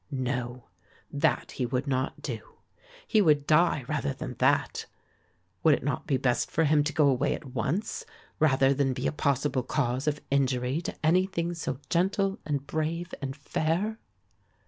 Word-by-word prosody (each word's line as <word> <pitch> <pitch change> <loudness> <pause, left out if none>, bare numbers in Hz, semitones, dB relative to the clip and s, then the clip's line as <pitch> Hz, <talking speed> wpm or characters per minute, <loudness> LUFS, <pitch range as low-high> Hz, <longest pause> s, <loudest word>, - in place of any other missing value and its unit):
No, 125 -2 -3 0.5
that 140 - +1
he 125 - 0
would 130 +2 -1
not 130 -1 -2
do. - - -6 0.5
He 215 - +3
would 150 -6 +4
die 155 -3 +3
rather 70 - -1
than - - -5
that. - - +2 0.7
Would 155 -3 +6
it - - -7
not 145 - -2
be 140 -4 +2
best 125 -2 +1
for 165 - +1
him 150 -1 +4
to 150 - 0
go 150 -2 +3
away 140 +2 +2
at 130 -3 -10
once 140 - -2 0.4
rather 135 -3 +4
than 135 -1 +1
be 125 +1 -4
a - - +2
possible 140 -2 0
cause 130 +1 -1
of 150 -1 +1
injury 130 +1 +1
to 165 - -5
anything 175 0 +2
so 160 -6 -3
gentle 195 +3 +1
and 145 -2 -1
brave 160 +3 -2
and 135 -1 -4
fair? 165 +9 -1
145 Hz, 165 wpm, -28 LUFS, 130-165 Hz, 0.7 s, Would